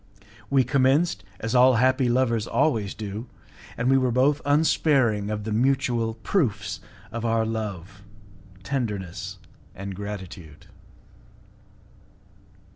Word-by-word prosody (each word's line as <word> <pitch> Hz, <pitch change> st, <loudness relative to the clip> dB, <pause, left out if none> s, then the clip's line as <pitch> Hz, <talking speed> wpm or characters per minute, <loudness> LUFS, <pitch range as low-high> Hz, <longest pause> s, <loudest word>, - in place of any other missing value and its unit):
We 135 Hz, -2 st, +4 dB
commenced 135 Hz, +6 st, +2 dB, 0.2 s
as 115 Hz, 0 st, -2 dB
all 130 Hz, 0 st, +6 dB
happy 130 Hz, +1 st, +3 dB
lovers 115 Hz, -3 st, +1 dB
always 110 Hz, -10 st, 0 dB
do, 105 Hz, +2 st, -6 dB, 0.5 s
and 120 Hz, -, -1 dB
we 135 Hz, 0 st, +5 dB
were 130 Hz, -1 st, +1 dB
both 135 Hz, +4 st, +2 dB
unsparing 140 Hz, -8 st, +2 dB
of 105 Hz, -1 st, -3 dB
the 110 Hz, -, -4 dB
mutual 120 Hz, -1 st, +1 dB
proofs 105 Hz, -, -1 dB, 0.3 s
of 115 Hz, 0 st, -5 dB
our 115 Hz, -1 st, +1 dB
love, 100 Hz, -4 st, -5 dB, 0.6 s
tenderness, 95 Hz, -6 st, -4 dB, 0.4 s
and 100 Hz, +1 st, -6 dB
gratitude. 95 Hz, -6 st, -8 dB
115 Hz, 110 wpm, -25 LUFS, 100-130 Hz, 0.6 s, all